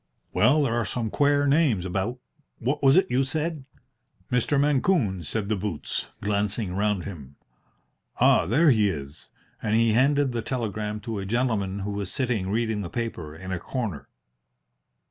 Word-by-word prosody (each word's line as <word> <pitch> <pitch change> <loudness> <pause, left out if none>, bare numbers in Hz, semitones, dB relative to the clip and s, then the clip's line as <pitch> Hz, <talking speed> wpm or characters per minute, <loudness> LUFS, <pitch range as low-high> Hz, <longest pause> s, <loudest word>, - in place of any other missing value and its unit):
"Well, 145 +7 +4
there 125 -5 0
are 120 0 +1
some 115 -3 -3
quare 145 0 +3
names 140 - +2
about. 95 +7 -2 0.4
What 135 +5 -1
was 135 -1 +5
it 190 +1 +3
you 130 +2 +3
said?" 155 +1 -3 0.7
"Mr. 125 +3 +2
Mancune," 140 - +2
said 100 +6 -2
the 110 - +1
boots, 95 -6 -4
glancing 105 -1 -1
round 100 -1 0
him. 70 -8 -9 0.8
"Ah, - - +5
there 150 - +5
he 105 -4 +3
is!" 70 -4 -7 0.3
and 105 0 0
he 115 0 +4
handed 140 +3 +3
the 120 -1 -2
telegram 110 -3 -3
to 110 -1 -4
a 95 - -4
gentleman 105 -4 0
who 100 +1 -3
was 100 -2 -3
sitting 120 -7 -1
reading 110 0 0
the 90 - -5
paper 90 -10 -4
in 95 +3 -8
a 90 - -2
corner. 110 - -4
110 Hz, 165 wpm, -26 LUFS, 100-130 Hz, 0.8 s, was